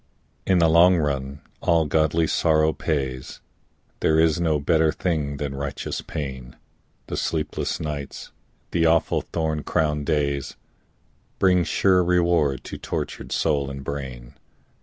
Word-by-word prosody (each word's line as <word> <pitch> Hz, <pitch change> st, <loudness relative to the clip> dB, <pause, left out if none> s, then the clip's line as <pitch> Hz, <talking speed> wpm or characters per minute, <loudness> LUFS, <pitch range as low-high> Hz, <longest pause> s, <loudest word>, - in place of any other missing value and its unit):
In 95 Hz, -, +4 dB
the 85 Hz, -1 st, +5 dB
long 85 Hz, +3 st, +6 dB
run 70 Hz, -3 st, -2 dB, 0.2 s
all 85 Hz, -1 st, +3 dB
godly 80 Hz, +2 st, +2 dB
sorrow 80 Hz, 0 st, +2 dB
pays, 65 Hz, -4 st, -3 dB, 0.6 s
There 80 Hz, 0 st, +3 dB
is 80 Hz, 0 st, +3 dB
no 80 Hz, -3 st, +2 dB
better 80 Hz, +2 st, +2 dB
thing 75 Hz, -6 st, -2 dB
than 70 Hz, -1 st, -3 dB
righteous 70 Hz, 0 st, -4 dB
pain, 65 Hz, -4 st, -6 dB, 0.5 s
The -, -, -5 dB
sleepless 80 Hz, -2 st, -2 dB
nights, 75 Hz, -3 st, -6 dB, 0.4 s
the 85 Hz, -1 st, +2 dB
awful 80 Hz, 0 st, +2 dB
thorn 80 Hz, -2 st, -2 dB
crowned 75 Hz, -3 st, -1 dB
days, 70 Hz, -2 st, -1 dB, 0.8 s
Bring 90 Hz, -2 st, +3 dB
sure 90 Hz, +3 st, +3 dB
reward 85 Hz, -6 st, +2 dB
to -, -, -8 dB
tortured -, -, -5 dB
soul 70 Hz, -3 st, 0 dB
and 70 Hz, 0 st, -7 dB
brain. 65 Hz, -4 st, -6 dB
75 Hz, 130 wpm, -24 LUFS, 70-80 Hz, 0.8 s, long